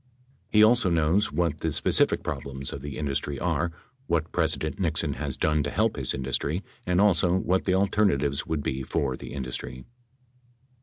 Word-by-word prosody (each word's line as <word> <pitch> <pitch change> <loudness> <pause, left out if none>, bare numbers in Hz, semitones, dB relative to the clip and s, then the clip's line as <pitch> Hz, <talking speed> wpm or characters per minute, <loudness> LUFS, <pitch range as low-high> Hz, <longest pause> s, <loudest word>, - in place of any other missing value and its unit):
He 105 0 +5
also 115 -2 +4
knows 85 +5 +2
what 80 -1 0
the 80 - -1
specific - - +2
problems 70 0 -4
of 70 - -6
the 70 0 -6
industry 70 -1 -2
are, 85 +5 0 0.4
what 85 -1 0
President 80 +4 -1
Nixon 85 -5 0
has 70 0 -4
done 75 0 +2
to 75 - -2
help 110 +7 +1
his 65 -3 +1
industry 70 +7 -2 0.2
and 90 0 +2
also 90 -3 +4
what 95 0 +1
the 95 - +2
alternatives 95 -8 +1
would 80 -3 -2
be 65 - -2
for 65 0 -1
the - - -9
industry. 65 -1 -6
80 Hz, 165 wpm, -26 LUFS, 70-90 Hz, 0.4 s, He